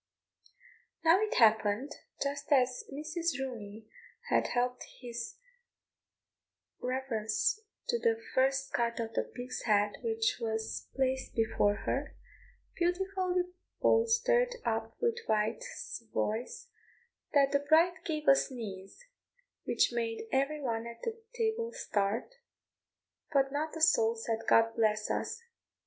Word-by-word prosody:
Now 335 +5 +6
it 430 - 0
happened, 220 +3 +4 0.3
just 280 +1 -4
as 255 -2 +3
Mrs. 315 +2 -2
Rooney 220 -5 -6 0.4
had - - +3
helped 250 0 0 0.2
his 240 -1 -6 1.4
reverence 250 - 0 0.3
to 475 - +2
the 455 -1 +2
first 270 +1 +2
cut 235 0 0
of 225 -1 -3
the - - +2
pig's 250 +1 -6
head 205 -1 +3
which 445 -2 0
was 220 -1 -3
placed 265 -1 -1
before 220 -2 +2
her, 280 +2 -2 0.6
beautifully 365 +1 0 0.4
bolstered 485 +2 +3
up - - -2
with 470 0 +1
white 215 +1 +1
savoys, 225 +1 -4 0.7
that 275 -1 +5
the 280 - +3
bride 320 +5 +4
gave 305 -2 -3
a 275 - +9
sneeze, 220 - -5 0.6
which - - +2
made 225 -1 -2
every 275 +3 +1
one 230 -3 -2
at 235 0 -9 0.3
table 460 0 0
start, 200 +2 -1 1.0
but 275 -2 +3
not 310 +3 -2
a - - -6
soul 230 -9 +4
said 225 0 -2
"God 225 0 +5
bless 215 -2 +1
us." 465 - -3
265 Hz, 120 wpm, -32 LUFS, 225-335 Hz, 1.4 s, a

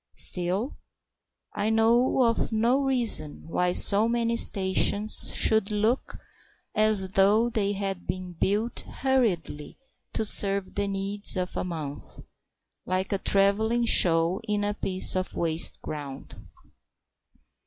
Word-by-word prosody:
Still, 185 +8 -1 0.8
I 205 +1 -2
know 235 +4 +1
of 230 0 -1
no 230 +4 0
reason 240 - +2
why 180 +2 -1
so 205 +4 +5
many 235 0 -1
stations 200 0 +3
should 220 -2 +1
look 215 +4 -2 0.6
as 215 -3 +2
though 205 +5 +1
they 205 -3 -1
had 195 -2 -6
been 185 -1 -6
built 210 +7 -2
hurriedly 220 - -3 0.4
to 220 - -2
serve 200 -2 +2
the 205 0 -2
needs 200 +1 -1
of 180 0 -4
a - - -3
month, 155 -5 -8 0.7
like 185 +1 -4
a 195 - -2
travelling 220 +5 0
show 170 -3 +3
in 210 -1 -2
a 205 0 -2
piece 190 -3 0
of 185 0 -4
waste 165 -1 +1
ground. 145 -3 -9
200 Hz, 120 wpm, -25 LUFS, 185-225 Hz, 0.8 s, so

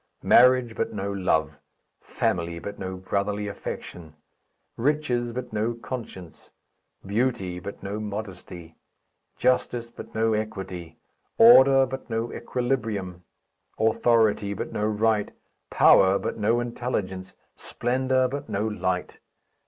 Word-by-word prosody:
Marriage, 125 -2 +5
but 115 - -2
no 100 0 -3
love; 80 -5 0 0.4
family, 85 -1 -2
but 100 +4 -7
no 95 -1 -4
brotherly 100 +2 -2
affection; 85 -5 -7 0.6
riches, 125 -3 0
but 125 -1 -6
no 110 +2 -1
conscience; 115 -8 -8 0.6
beauty, 100 -4 -1
but 100 +3 -9
no 100 +2 -4
modesty; 95 -5 -7 0.6
justice, 120 -2 0
but - - -11
no 110 0 +2
equity; 95 -6 -5 0.4
order, 135 - +8
but 130 0 -7
no 115 +1 -2
equilibrium; 115 -8 -3 0.5
authority, 110 -2 +2
but - - -5
no 105 - 0
right; 110 -1 +1 0.4
power, 95 +1 +5
but - - -4
no 110 +2 +1
intelligence; 105 -6 -4 0.2
splendour, 130 +2 0
but 140 0 -6
no 105 +1 -1
light. 90 -4 -3
110 Hz, 115 wpm, -25 LUFS, 95-120 Hz, 0.6 s, order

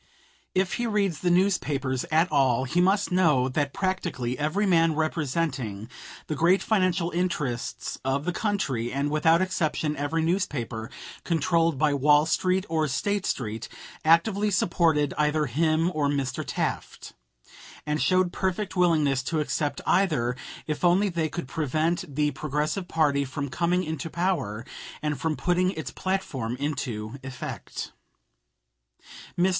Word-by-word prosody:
If 185 0 +1
he 240 - 0
reads 200 -7 0
the 180 - 0
newspapers 150 -8 +1
at 165 +2 +2
all, 130 -2 +3
he 170 +7 +1
must 195 +2 +2
know 155 -8 +3
that 140 +1 -1
practically 175 -11 -2
every 155 +9 0
man 165 -4 +3
representing 140 -9 -2 0.3
the - - -3
great 170 +6 +3
financial 185 -4 +1
interests 150 -9 -2
of 135 +2 -1
the 180 - -1
country, 145 - -1
and 140 +2 -1
without 160 +3 +4
exception 155 -4 -1
every 150 +3 -1
newspaper 140 - -2 0.3
controlled 165 -1 +1
by 150 +1 +2
Wall 145 +2 +4
Street 185 +3 +1
or 160 -1 +1
State 195 +9 -1
Street, 110 -3 -3 0.3
actively 195 +6 +3
supported 165 -6 +2
either 150 0 +2
him 155 +5 +1
or 150 -2 +1
Mr. 140 -3 -1
Taft, - - -4 0.7
and 150 0 -1
showed 185 -1 +2
perfect 190 +2 -2
willingness 155 -7 +3
to 155 +4 -2
accept 150 0 -1
either 150 -11 +2 0.3
if 150 +1 -4
only 185 +4 +4
they 165 -3 -1
could 170 -2 -5
prevent 155 +1 -1
the 150 0 +2
Progressive 150 +6 -2
party 145 -4 +2
from 140 +1 -4
coming 175 +6 +1
into 160 -1 -4
power 165 - -1 0.4
and 150 -4 -2
from 160 -1 0
putting 180 +1 +2
its 160 - -5
platform 140 -12 -2
into 125 -5 -3
effect. 130 -1 -6 1.5
Mr. 180 +2 +4
155 Hz, 140 wpm, -26 LUFS, 140-180 Hz, 1.5 s, without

